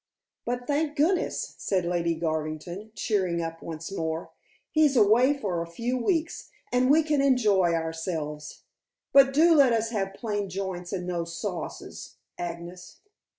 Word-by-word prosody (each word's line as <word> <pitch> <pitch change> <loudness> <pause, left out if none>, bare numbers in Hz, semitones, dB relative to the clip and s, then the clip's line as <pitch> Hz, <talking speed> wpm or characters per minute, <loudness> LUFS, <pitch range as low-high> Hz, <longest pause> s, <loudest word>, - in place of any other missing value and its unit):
But 245 +1 -3
thank 295 +2 0
goodness," 345 +6 +1
said 185 -3 0
Lady 170 -1 0
Garvington, 160 +5 -4
cheering 190 -6 0
up 165 0 -4
once 160 +2 -7
more, 160 -3 -3 0.4
"he's 305 -4 +3
away 240 +6 +5
for 185 -10 -2
a 170 - -5
few 235 +9 -2
weeks, 320 +6 -1 0.2
and 250 +1 +3
we 315 +3 +5
can 300 -2 +1
enjoy 210 -10 +3
ourselves. 160 -2 -4 0.5
But 275 0 +7
do 325 +5 +5
let 275 -6 +5
us 225 0 0
have 195 -3 -2
plain 205 -3 -3
joints 185 -2 -4
and 185 -3 -3
no 175 -1 -2
sauces, 170 0 -6 0.2
Agnes." 175 +1 -7
195 Hz, 145 wpm, -27 LUFS, 170-255 Hz, 0.5 s, But